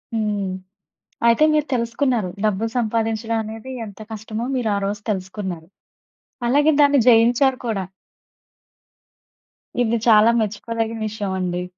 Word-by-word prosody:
హ్మ్. 210 Hz, -3 st, -1 dB, 0.8 s
అయితే 235 Hz, +6 st, +5 dB
మీరు 305 Hz, -1 st, +1 dB
తెలుసుకున్నారు. 235 Hz, -3 st, 0 dB, 0.2 s
డబ్బులు 215 Hz, +2 st, 0 dB
సంపాదించడం 225 Hz, 0 st, -1 dB
అనేది 220 Hz, +4 st, -8 dB, 0.2 s
ఎంత 205 Hz, 0 st, -12 dB
కష్టమో? 215 Hz, +1 st, -5 dB
మీరు 235 Hz, -3 st, -1 dB
ఆరోజు 200 Hz, +1 st, -2 dB
తెలుసుకున్నారు. 190 Hz, -3 st, -4 dB, 0.8 s
అలాగే 290 Hz, +4 st, +4 dB
దాన్ని 285 Hz, -1 st, +5 dB
జయించారు 245 Hz, +3 st, +4 dB
కూడా. 200 Hz, -5 st, -1 dB, 2.0 s
ఇది 235 Hz, 0 st, +1 dB
చాలా 220 Hz, +1 st, +6 dB
మెచ్చుకోదగిన 225 Hz, +1 st, -2 dB
విషయం 205 Hz, -2 st, -4 dB
అండి. 180 Hz, -1 st, -2 dB
225 Hz, 105 wpm, -21 LUFS, 205-235 Hz, 2.0 s, చాలా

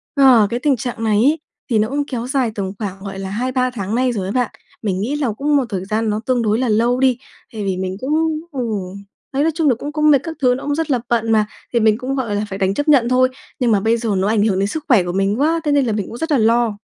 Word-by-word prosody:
Ờ, 255 Hz, -6 st, +6 dB
cái 240 Hz, -, -2 dB
tình 285 Hz, 0 st, +2 dB
trạng 235 Hz, -1 st, -4 dB
này 215 Hz, -2 st, +2 dB
ấy 290 Hz, +8 st, +3 dB, 0.3 s
thì 225 Hz, -3 st, +2 dB
nó 215 Hz, +2 st, +1 dB
cũng 285 Hz, +1 st, -1 dB
kéo 245 Hz, -3 st, -4 dB
dài 260 Hz, -4 st, 0 dB
tầm 190 Hz, -2 st, -3 dB
khoảng, 195 Hz, -3 st, -5 dB
gọi 195 Hz, -1 st, -6 dB
là, 190 Hz, 0 st, -5 dB
2-3 255 Hz, +4 st, -1 dB
tháng 215 Hz, -3 st, -4 dB
nay 255 Hz, 0 st, +2 dB
rồi 200 Hz, -5 st, -3 dB
á -, -, -3 dB
bạn. 250 Hz, -1 st, 0 dB, 0.3 s
Mình 195 Hz, -3 st, -1 dB
nghĩ 265 Hz, +7 st, -1 dB
là 270 Hz, -7 st, 0 dB
cũng 290 Hz, +7 st, 0 dB
một 270 Hz, -3 st, +2 dB
thời 190 Hz, -3 st, -3 dB
gian 220 Hz, +2 st, -1 dB
nó 210 Hz, -, -1 dB
tương 255 Hz, -2 st, +1 dB
đối 220 Hz, +1 st, +1 dB
là 255 Hz, -, 0 dB
lâu 235 Hz, +4 st, +2 dB
đi, 260 Hz, -2 st, +3 dB, 0.4 s
tại 215 Hz, -, -4 dB
vì 190 Hz, -2 st, -1 dB
mình 185 Hz, 0 st, -3 dB
cũng 270 Hz, +3 st, -2 dB, 0.4 s
ừ, 270 Hz, -, -5 dB, 0.7 s
đấy, 280 Hz, +2 st, +1 dB
nói 325 Hz, -, +2 dB
chung 320 Hz, -3 st, +2 dB
là 250 Hz, -, +3 dB
cũng 285 Hz, +6 st, -6 dB
cũng 305 Hz, 0 st, +2 dB
mệt, 280 Hz, -, +5 dB
các 325 Hz, -1 st, -6 dB
thứ 250 Hz, -2 st, +4 dB
nó 265 Hz, -, -7 dB
cũng 290 Hz, 0 st, -1 dB
rất 320 Hz, -1 st, -2 dB
là 250 Hz, -, +2 dB
bận 225 Hz, -1 st, +1 dB
mà, 215 Hz, -1 st, +3 dB, 0.3 s
thì 235 Hz, -, +3 dB
mình 215 Hz, -1 st, +3 dB
cũng, 260 Hz, +2 st, -3 dB
gọi 230 Hz, -6 st, -2 dB
là, 205 Hz, +1 st, -1 dB
phải 190 Hz, -, -5 dB
đành 190 Hz, 0 st, +1 dB
chấp 290 Hz, +6 st, -2 dB
nhận 255 Hz, -5 st, +4 dB
thôi. 255 Hz, 0 st, +4 dB, 0.3 s
Nhưng 240 Hz, -3 st, +2 dB
mà 205 Hz, -, +4 dB
bây 225 Hz, +3 st, +1 dB
giờ 230 Hz, -1 st, -3 dB
nó 190 Hz, +2 st, +1 dB
ảnh 210 Hz, -1 st, +2 dB
hưởng 195 Hz, -3 st, +1 dB
đến 200 Hz, -, +1 dB
sức 300 Hz, +8 st, -5 dB
khỏe 235 Hz, -9 st, +5 dB
của 175 Hz, -, -3 dB
mình 195 Hz, +5 st, 0 dB
quá 325 Hz, +3 st, +2 dB
thế 295 Hz, -, 0 dB
nên 285 Hz, -2 st, +3 dB
là 225 Hz, -, 0 dB
mình 205 Hz, -2 st, -2 dB
cũng 235 Hz, -, -8 dB
rất 325 Hz, +4 st, -3 dB
là 285 Hz, -, +4 dB
lo. 230 Hz, -1 st, +2 dB
235 Hz, 300 wpm, -19 LUFS, 210-270 Hz, 0.7 s, Ờ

